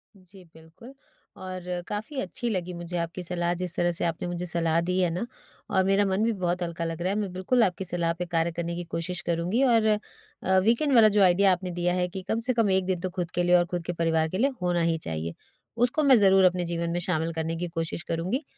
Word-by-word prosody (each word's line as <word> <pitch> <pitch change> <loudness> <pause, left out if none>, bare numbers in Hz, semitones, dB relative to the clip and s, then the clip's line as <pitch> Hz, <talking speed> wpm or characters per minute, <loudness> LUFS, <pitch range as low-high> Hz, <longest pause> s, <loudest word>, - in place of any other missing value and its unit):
जी, 190 0 -17
बिल्कुल। 160 +11 -15 0.4
और 185 -1 -6 0.3
काफ़ी 215 +7 -4
अच्छी 235 +6 -4
लगी 180 -4 -2
मुझे 175 0 -5
आपकी 170 +2 -3
सलाह 175 0 -1
जिस 180 -1 -4
तरह 175 0 +1
से 170 - -2
आपने 165 +1 -2
मुझे 175 0 -3
सलाह 165 -1 +1
दी 180 +2 -1
है 180 -2 +2
ना 180 +7 -2 0.4
और 190 -1 +2
मेरा 195 +1 +3
मन 195 +2 +1
भी 230 - +2
बहुत 180 -2 -1
हल्का 170 -1 -4
लग 165 0 -4
रहा 180 - 0
है, 195 - 0
मैं 200 -3 -3
बिल्कुल 205 +7 +2
आपकी 185 0 -1
सलाह 170 -1 0
पे - - 0
कार्य 170 -1 0
करने 170 0 -4
की 175 - -4
कोशिश 175 +2 -4
करूँगी 175 +7 0
और 230 -4 +4
अ, 210 -2 -2
वीकेंड 240 +7 +2
वाला 225 -2 +8
जो 205 0 +2
आइडिया 190 +2 +5
आपने 180 0 -2
दिया 175 0 0
है, 180 0 0
कि 190 +1 -7
कम 225 - 0
से 250 +2 -1
कम 230 -3 +2
1 190 0 +2
दिन 185 -1 -1
तो 185 - -2
खुद 180 -2 -4
के 175 - 0
लिए 175 0 +4
और 175 0 +4
खुद 175 0 -4
के 175 - -2
परिवार 165 -1 +1
के 185 - -3
लिए 265 +7 +3
होना 175 -1 +1
ही 165 -1 +1
चाहिए, 80 - -4 0.4
उसको 245 +6 +2
मैं 270 -3 +7
ज़रूर 195 -2 +5
अपने 180 -1 +2
जीवन 170 0 -2
में 175 - -1
शामिल 165 -2 -1
करने 160 0 -2
की 175 +1 -3
कोशिश 165 -1 -4
करूँगी। 180 - -2
180 Hz, 245 wpm, -26 LUFS, 170-195 Hz, 0.4 s, वाला